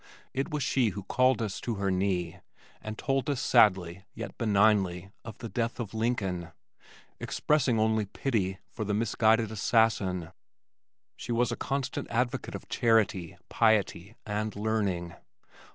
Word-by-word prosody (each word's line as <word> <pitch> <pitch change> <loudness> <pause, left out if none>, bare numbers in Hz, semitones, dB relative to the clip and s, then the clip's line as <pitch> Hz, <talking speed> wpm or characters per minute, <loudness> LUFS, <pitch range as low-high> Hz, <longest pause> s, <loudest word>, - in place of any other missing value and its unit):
It 135 +1 -2
was 150 -2 -2
she 125 -4 +2
who 100 0 -6
called 130 +3 +2
us 105 -3 -4
to 115 - -2
her 100 -1 -1
knee 90 -2 -1 0.4
and 110 0 -6
told 135 +1 -1
us 140 -3 0
sadly 95 -7 +3
yet - - -6
benignly 100 -4 +2
of 115 -3 -9
the 115 - -6
death 115 +1 -2
of 115 -4 -5
Lincoln, 100 -7 -1 0.7
expressing 135 -6 +1
only 110 -1 +2
pity 100 -5 -1
for 110 - -4
the 105 0 -1
misguided 110 0 +2
assassin. 100 -5 +1 0.9
She - - -6
was 120 +1 +2
a - - -1
constant 135 -1 -3
advocate 120 +1 -1
of - - -8
charity, 110 -7 +1
piety, 110 -2 +1
and 105 0 -2
learning. 100 -5 -1
110 Hz, 140 wpm, -29 LUFS, 95-115 Hz, 0.9 s, sadly